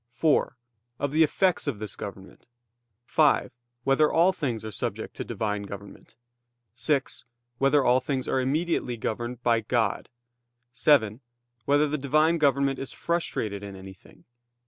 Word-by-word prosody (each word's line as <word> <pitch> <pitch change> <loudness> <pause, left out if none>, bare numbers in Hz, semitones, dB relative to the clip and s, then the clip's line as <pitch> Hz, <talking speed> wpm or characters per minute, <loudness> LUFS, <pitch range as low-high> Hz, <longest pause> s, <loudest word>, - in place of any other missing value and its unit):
(4) 155 -4 +1 0.4
Of 140 +1 -2
the 155 +2 +2
effects 180 +2 +2
of 135 -7 -1
this 105 -1 -6
government? 95 -1 -9 0.6
(5) 150 +1 +3 0.3
Whether 135 +3 +3
all 175 +3 +4
things 120 -10 -3
are 110 - -5
subject - - -4
to - - -3
Divine 105 -2 -2
government? 100 0 -10 0.6
(6) 135 +3 -1 0.4
Whether 135 +1 +4
all 125 +1 +5
things 130 0 -3
are - - +1
immediately 140 -2 -1
governed 120 +2 -4
by 115 -1 +3
God? 115 0 -1 0.6
(7) 120 -4 +3 0.5
Whether 145 +2 +3
the 150 +1 -2
Divine 155 +5 +2
government 140 -2 +2
is 135 - -4
frustrated 110 - -2
in 100 -1 -8
anything? 95 0 -14
130 Hz, 140 wpm, -26 LUFS, 110-150 Hz, 0.6 s, all